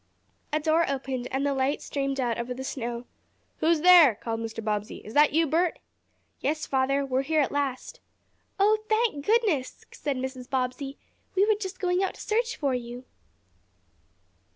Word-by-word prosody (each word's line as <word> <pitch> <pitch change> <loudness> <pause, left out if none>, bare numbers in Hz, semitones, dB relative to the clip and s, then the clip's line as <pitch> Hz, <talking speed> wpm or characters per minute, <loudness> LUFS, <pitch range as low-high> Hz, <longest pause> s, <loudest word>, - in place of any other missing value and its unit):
A 305 - +1
door 320 +1 +2
opened 260 -2 -3
and 270 +2 -1
the 285 - +1
light 270 +2 0
streamed 275 -1 -3
out 240 -3 0
over 245 +1 -3
the 265 - -6
snow. 240 -2 -4 0.5
"Who - - -1
is 330 -2 +3
there?" 340 - +8
called 225 +1 -4
Mr. 225 0 -5
Bobbsey. 210 -1 -2
"Is 215 - -9
that 295 +2 +5
you, 325 +2 +3
Bert?" 330 +3 +1 0.6
"Yes, 310 +3 -1
father. 275 +1 +1
We're 260 -1 0
here 310 +3 0
at 275 - 0
last." 280 -3 -3 0.6
"Oh, 425 +2 +4
thank 435 -9 +1
goodness!" 410 - +1
said 285 -3 -3
Mrs. 255 -1 -5
Bobbsey. 260 +1 -2 0.4
"We 390 +1 +4
were 435 - +4
just 390 -2 -6
going 360 0 +1
out 385 - -1
to - - -15
search 460 +2 0
for 280 -3 -1
you!" 245 0 -5
275 Hz, 175 wpm, -27 LUFS, 255-330 Hz, 0.6 s, there